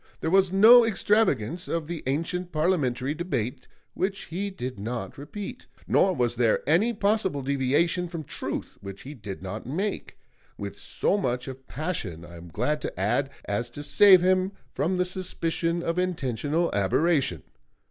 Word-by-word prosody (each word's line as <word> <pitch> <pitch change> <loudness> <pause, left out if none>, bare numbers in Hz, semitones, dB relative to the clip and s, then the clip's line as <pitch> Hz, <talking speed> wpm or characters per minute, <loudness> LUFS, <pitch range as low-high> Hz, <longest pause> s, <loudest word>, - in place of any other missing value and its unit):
There 160 - -2
was 190 -1 +4
no 225 +5 +8
extravagance 190 - +1
of 165 -2 -2
the 170 0 -5
ancient 175 +6 -2
parliamentary 150 -5 0
debate 135 -7 -3 0.3
which 195 +1 -2
he 195 +5 -3
did 130 - -6
not 110 -2 -4
repeat; 205 - -8 0.2
nor 195 - +4
was 120 -3 +1
there 120 -1 +1
any 180 +10 +4
possible 200 - 0
deviation 140 +6 +1
from 165 -2 -6
truth - - -5
which 100 0 -9
he 140 - -8
did 100 - -8
not 105 +4 -6
make, 190 +10 -3 0.4
with - - -6
so 205 - 0
much 125 -7 -2
of 130 0 -9
passion, 120 - -4
I 85 0 -12
am 85 +1 -11
glad 125 - -1
to - - -5
add, 120 +8 +1 0.2
as 110 +4 -2
to 145 +5 -7
save 185 +5 +7
him 185 +1 +2 0.2
from 165 +7 0
the 180 - +2
suspicion 170 -2 -1
of 170 +1 -1
intentional 160 -2 -1
aberration. 100 - +1
155 Hz, 160 wpm, -26 LUFS, 125-185 Hz, 0.4 s, no